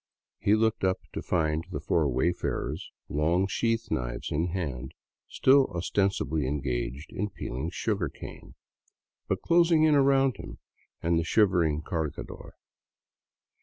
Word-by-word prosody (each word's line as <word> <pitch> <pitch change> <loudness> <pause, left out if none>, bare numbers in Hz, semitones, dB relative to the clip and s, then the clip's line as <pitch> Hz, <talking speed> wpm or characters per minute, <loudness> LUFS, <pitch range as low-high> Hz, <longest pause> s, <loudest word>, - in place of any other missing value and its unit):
He 105 - +3
looked 110 0 +1
up 95 0 +2 0.2
to - - -3
find 80 -2 0
the - - -4
four 80 -4 +1
wayfarers, 85 +7 -1 0.2
long 85 +6 +1
sheath 115 +2 -1
knives - - -3
in 80 +4 0
hand, 80 -9 -4 0.3
still 135 +1 +4
ostensibly 85 -6 0
engaged 65 0 -3
in 105 +2 -2
peeling 70 -3 -4
sugarcane, - - -4 0.7
but - - -2
closing 170 -2 +4
in 155 -1 +5
around 135 -2 +4
him - - -9 0.5
and 85 0 +2
the - - 0
shivering 85 -5 +2
cargadtJr. 80 -4 -5
85 Hz, 125 wpm, -28 LUFS, 75-110 Hz, 0.7 s, in